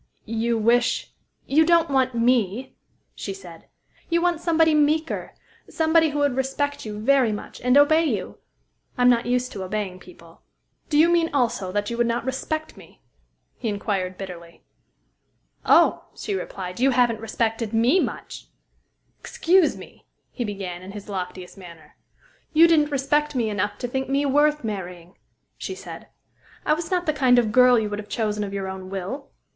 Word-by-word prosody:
"You 230 +1 -1
wish" 235 +3 +1 0.3
"You 310 +4 +4
don't 335 -1 +3
want 260 -2 +1
me," 235 0 +1 0.4
she - - -6
said. 390 - -13 0.4
"You 340 0 +2
want 345 -1 0
somebody 325 -2 +3
meeker, 305 +2 0 0.3
somebody 320 0 +3
who 295 - -4
would 285 -3 +1
respect 270 0 -2
you 210 -1 -6
very 250 +1 +3
much, 210 - -7
and 250 +2 +3
obey 315 +3 +5
you. - - -3 0.6
I'm 250 0 +5
not 235 0 +1
used 250 +1 0
to 195 - -6
obeying 190 -1 -4
people." 170 -2 -17 0.5
"Do 295 - +1
you 320 +2 +6
mean 340 -1 +2
also 225 -8 0
that 205 +2 -1
you 235 - -3
would 240 - +3
not 235 +1 -2
respect 310 +4 -3
me?" - - -17 0.6
he 230 - -2
inquired 195 -3 -2
bitterly. 170 -3 -10 1.0
"Oh," - - +4
she 410 - -4
replied, 185 - -5
"you 265 +2 +4
haven't 240 -3 +2
respected 225 0 -2
me 235 +10 +3
much!" - - -5 0.7
"Excuse 355 0 +2
me" - - -14 0.2
he 245 - -4
began, 195 -5 -5
in 190 +2 -10
his 205 0 -9
loftiest 185 0 -6
manner. 170 -4 -14 0.6
"You 325 +2 +7
didn't 305 -3 +3
respect 295 +1 0
me 230 -4 0
enough 205 0 -2
to 245 - -4
think 265 +2 -3
me 280 +1 +1
worth 295 +1 +2
marrying," 180 -4 -6 0.4
she 380 - -5
said. - - -10 0.6
"I - - +3
was 320 +1 -3
not 360 -1 0
the 310 - +1
kind 260 -4 +4
of 230 -3 +2
girl 250 +1 +6
you 220 -2 0
would 205 0 -4
have 210 - -9
chosen 210 -2 -1
of 200 - -5
your 195 -1 -4
own 190 0 -7
will." 195 +9 -5
245 Hz, 170 wpm, -23 LUFS, 205-295 Hz, 1.0 s, You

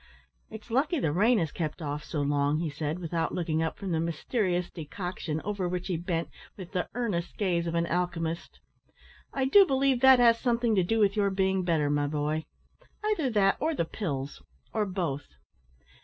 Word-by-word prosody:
"It's 220 +1 -10
lucky 285 +8 +2
the 155 - +1
rain 220 +9 +4
has 165 -6 0
kept 155 -2 -3
off 150 -2 -4
so 150 -1 -2
long," 145 +1 +1
he 165 -2 -2
said, 150 +2 -3
without 165 -2 -2
looking 160 -3 0
up 160 - -2
from 195 -2 -4
the 160 - +1
mysterious 175 +2 -1
decoction 165 -1 -4
over 200 -3 -2
which 180 +1 -3
he 180 - 0
bent 170 0 -2 0.3
with 185 -3 -9
the 185 -3 -2
earnest 205 -9 -2
gaze 175 -4 0
of 165 - -2
an 170 0 +2
alchymist. 170 -1 -2 0.7
"I 265 -1 0
do 395 +10 +7
believe 270 -6 +2
that 265 -1 +8
has 235 -1 +5
something 235 -2 +1
to 190 -3 +3
do 225 +6 0
with 205 -2 +3
your 205 -2 +2
being 190 -1 +1
better, 160 -4 +1
my 145 0 +1
boy 150 +1 -1 0.7
either 320 -11 +1
that 200 -4 +3
or 315 +3 0
the 170 - 0
pills, 145 -7 -4 0.3
or 210 -2 0
both." 165 - -3
180 Hz, 185 wpm, -28 LUFS, 160-215 Hz, 0.7 s, that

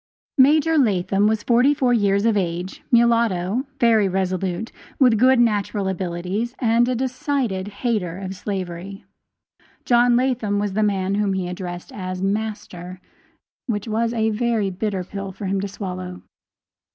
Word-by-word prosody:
Major 310 +4 +5
Latham 195 -4 +2
was 220 -1 0
forty 250 +4 +4
four 255 -3 +2
years 200 -2 +2
of 225 -2 +3
age, 180 -1 -2
mulatto, 230 -1 +2
very 225 -4 +4
resolute, 185 +2 -2 0.3
with 245 -6 +4
good 255 +1 +5
natural 205 -3 +1
abilities, 190 +6 -3
and 235 0 +2
a 255 - 0
decided 255 -6 -2
hater 205 -4 -2
of 190 -1 -5
slavery. 190 0 -5 0.8
John 240 0 +4
Latham 240 -5 +1
was 205 -1 -1
the 215 - 0
man 195 -2 0
whom 200 -1 +1
he 190 -2 -2
addressed 180 -1 -6
as 185 -2 -5
"master," 195 -3 -4 0.7
which 210 -2 -2
was 225 +1 0
a 220 -1 0
very 220 -3 0
bitter 195 0 -2
pill 195 +1 -6
for 195 +2 -8
him 195 0 0
to 200 - -2
swallow. 185 -2 -6
205 Hz, 145 wpm, -22 LUFS, 190-235 Hz, 0.8 s, Major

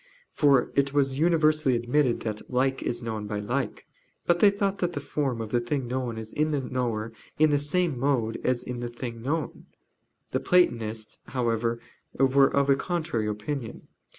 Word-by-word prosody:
For 140 -4 +3
it 140 0 +2
was 135 -1 +1
universally 155 -4 +3
admitted 120 +2 +1
that 110 -2 -5
"like 130 +1 +1
is 120 0 -3
known 110 -2 -4
by 105 0 -3
like." 120 +3 -3 0.4
But 175 0 +3
they 205 - +7
thought 200 -1 -1
that 175 -1 0
the 145 - -3
form 140 -4 -2
of 110 -1 -5
the 120 - +3
thing 125 +2 -2
known 125 -2 -3
is 110 0 -7
in 155 +1 +1
the 150 -2 0
knower 120 -4 -2 0.2
in 155 0 +4
the 145 - +3
same 150 -1 0
mode 120 -5 0
as 125 -1 0
in 125 -1 -5
the 120 0 -4
thing 120 -1 -6
known. 150 +3 -3 0.6
The - - +1
Platonists 115 -11 +1
however 115 -2 0 0.4
were 135 +1 +5
of 140 0 +2
a 140 - +5
contrary 155 -8 -2
opinion. 110 +4 -5
130 Hz, 180 wpm, -27 LUFS, 115-145 Hz, 0.6 s, they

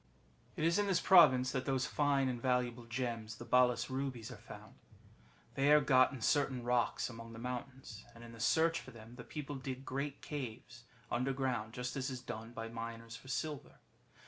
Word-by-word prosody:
^ - - -35 0.5
It - - -3
is 170 +4 +3
in 205 - +1
this 185 -3 +3
province 130 -9 +6
that 130 -1 -2
those 135 -2 +1
fine 140 -2 +2
and 125 -2 -3
valuable 125 -2 0
gems 115 -2 -3
the 120 - -9
Balas 125 +1 +3
Rubies 130 -4 -3
are - - -7
found. - - -12 0.8
They 140 +2 +3
are 150 - +8
got 130 -3 +5
in 130 -4 -8
certain 135 -1 +1
rocks 120 0 +1
among 115 -1 -9
the - - -9
mountains, 125 -2 -6
and 115 - -12
in 120 - -10
the 115 - -12
search 160 +8 +3
for - - -11
them 115 0 -12
the 120 - -8
people 145 -2 -6
dig 130 0 -6
great 140 +2 -4
caves 120 -3 -6 0.3
underground, 125 -3 -1
just 125 +2 -4
as 135 -1 -2
is 130 -1 -5
done 115 -2 -7
by 115 -1 -5
miners 115 0 -7
for 130 - -12
silver. 145 +2 -4
125 Hz, 195 wpm, -35 LUFS, 115-135 Hz, 0.8 s, are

